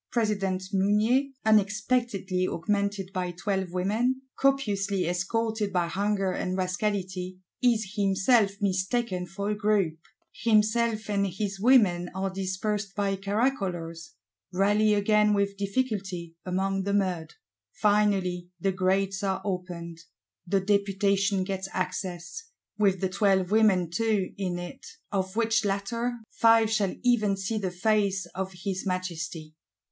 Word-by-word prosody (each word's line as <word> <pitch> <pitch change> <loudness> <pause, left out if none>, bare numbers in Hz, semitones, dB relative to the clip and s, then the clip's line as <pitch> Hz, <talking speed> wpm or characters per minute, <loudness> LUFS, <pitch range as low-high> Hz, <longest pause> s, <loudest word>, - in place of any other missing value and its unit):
President 200 -5 0
Mounier, 210 +7 +3 0.2
unexpectedly 210 -3 +1
augmented 200 +2 -1
by 180 -1 -1
Twelve 190 0 -2
Women, 220 +8 0
copiously 200 -9 +1
escorted 210 +4 -1
by 180 -2 +1
Hunger 195 +1 0
and 185 +1 -2
Rascality, 185 -1 -2 0.2
is 220 -5 +2
himself 200 +1 +3
mistaken 190 0 0
for 200 +4 -3
a - - 0
group: 205 -6 +1 0.3
himself 220 0 +2
and 200 -1 +1
his 195 +1 -4
Women 200 -7 +4
are 190 0 -1
dispersed 195 +2 -3
by 200 -1 0
caracolers; 195 - -2 0.4
rally 205 +3 +3
again 210 0 +3
with 200 0 0
difficulty, 195 -5 -2
among 190 +1 -1
the 200 +1 0
mud. 185 -5 -1 0.4
Finally 195 -4 +1
the 195 - +1
Grates 190 +1 0
are 190 -1 0
opened: 175 -3 -4 0.5
the 195 +2 +2
Deputation 200 0 +1
gets 190 0 -3
access, 185 - -4 0.3
with 195 -3 +2
the 190 - +1
Twelve 195 -1 +2
Women 210 -5 +4
too 215 -1 0
in 185 -3 -2
it; 175 0 -8 0.3
of 190 -1 -2
which 225 0 +2
latter, 230 +5 -1
Five 225 -1 +4
shall 205 -4 +1
even 215 -5 +3
see 195 +3 -2
the 190 -3 -1
face 195 0 +1
of 190 +1 -4
his 190 -1 -2
Majesty. 170 -4 -4
195 Hz, 125 wpm, -27 LUFS, 185-210 Hz, 0.5 s, Women